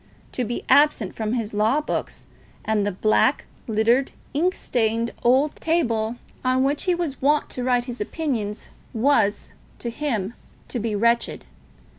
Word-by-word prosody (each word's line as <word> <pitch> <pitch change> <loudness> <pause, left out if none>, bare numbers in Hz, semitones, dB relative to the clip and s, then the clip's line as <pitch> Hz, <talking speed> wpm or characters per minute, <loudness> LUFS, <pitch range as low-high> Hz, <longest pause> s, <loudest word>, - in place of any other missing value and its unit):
To 250 - -2
be 240 +1 -4
absent 285 -9 +4
from 220 0 -2
his 230 -3 -2
law 220 +7 +2
books 300 - -4 0.4
and 210 -2 +1
the - - 0
black, 215 +8 +2 0.2
littered, 230 +5 +2 0.2
ink 350 +6 +1
stained 230 -1 0
old 265 +5 +3
table 240 -9 0 0.3
on 255 0 +2
which 285 +2 0
he 360 -2 +3
was 335 -6 -3
wont 295 +2 +2
to 250 - -4
write 245 -1 +2
his 245 -3 -6
opinions, 225 -5 -3 0.3
was, 220 -4 +2 0.3
to 235 - -4
him, 230 -7 -2 0.4
to 245 - -3
be 215 -1 -2
wretched. 235 +3 +1
240 Hz, 150 wpm, -23 LUFS, 220-280 Hz, 0.4 s, absent